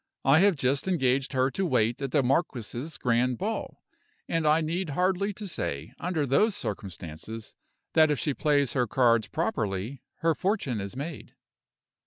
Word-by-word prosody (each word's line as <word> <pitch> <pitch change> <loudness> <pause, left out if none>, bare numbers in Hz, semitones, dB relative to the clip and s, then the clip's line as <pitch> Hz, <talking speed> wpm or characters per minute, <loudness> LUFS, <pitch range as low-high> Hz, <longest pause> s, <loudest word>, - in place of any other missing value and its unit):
I 140 +4 +6
have 195 -1 +5
just 135 +3 0
engaged 135 -6 +1
her 130 +1 +2
to 195 - -2
wait 120 -7 +1
at 135 - -2
the 140 +1 +2
marquis's 130 0 -1
grand 125 0 +1
ball, - - -4 0.4
and 165 -2 0
I 155 +1 +5
need 165 +2 -2
hardly 190 +2 +1
say, 85 - -5
under 170 -4 -1
those 195 - +3
circumstances, 95 - -6 0.4
that 155 -1 +6
if 150 - +1
she 145 - 0
plays 145 -3 +2
her 125 -3 +1
cards 115 -2 +3
properly 120 - -2 0.2
her 165 0 +3
fortune 170 - -1
is 100 +4 -6
made." 145 +3 -6
135 Hz, 155 wpm, -28 LUFS, 120-165 Hz, 0.4 s, I